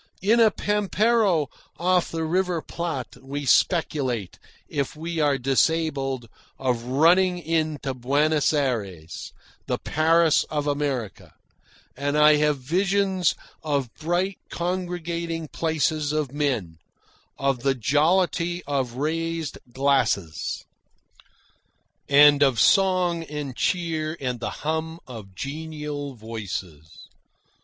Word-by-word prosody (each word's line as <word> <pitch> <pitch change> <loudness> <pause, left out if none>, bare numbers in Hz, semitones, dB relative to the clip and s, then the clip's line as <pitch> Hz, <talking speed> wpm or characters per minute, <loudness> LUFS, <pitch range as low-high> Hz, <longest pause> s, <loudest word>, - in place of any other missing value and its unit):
In 225 +4 +4
a 225 -1 +7
pampero 210 -4 +1 0.3
off 180 +1 +2
the 165 -1 -3
River 180 +1 0
Plate 160 -8 -5
we 140 +2 -5
speculate, 130 - +1 0.3
if 140 -1 -3
we 165 +2 -4
are 145 -2 +3
disabled, 135 -1 0 0.3
of 125 -3 -1
running 175 +8 +4
in 160 -2 -1
to 135 - -2
Buenos 145 +4 +2
Ayres, 105 - -3 0.4
the - - 0
"Paris 160 +1 +3
of 150 -1 -3
America," 140 -7 -3 0.6
and 145 +2 -1
I 150 0 +6
have 150 -1 +2
visions 190 +5 +1 0.3
of 140 -6 -2
bright 175 +4 -1
congregating 170 -2 -3
places 155 -2 0
of 150 -4 -1
men, 120 - -1 0.6
of 135 -2 0
the 135 0 +1
jollity 170 - +1
of 135 -4 -1
raised 165 +3 -2
glasses, 130 - 0 1.4
and 145 0 +7
of 135 -5 +4
song 180 - +3
and 145 -4 -5
cheer 160 -2 -1
and 125 -3 -3
the 120 - -3 0.2
hum 160 +1 -2
of 105 -7 -10
genial 150 - -5
voices. 95 -8 -7
150 Hz, 110 wpm, -24 LUFS, 135-170 Hz, 1.4 s, a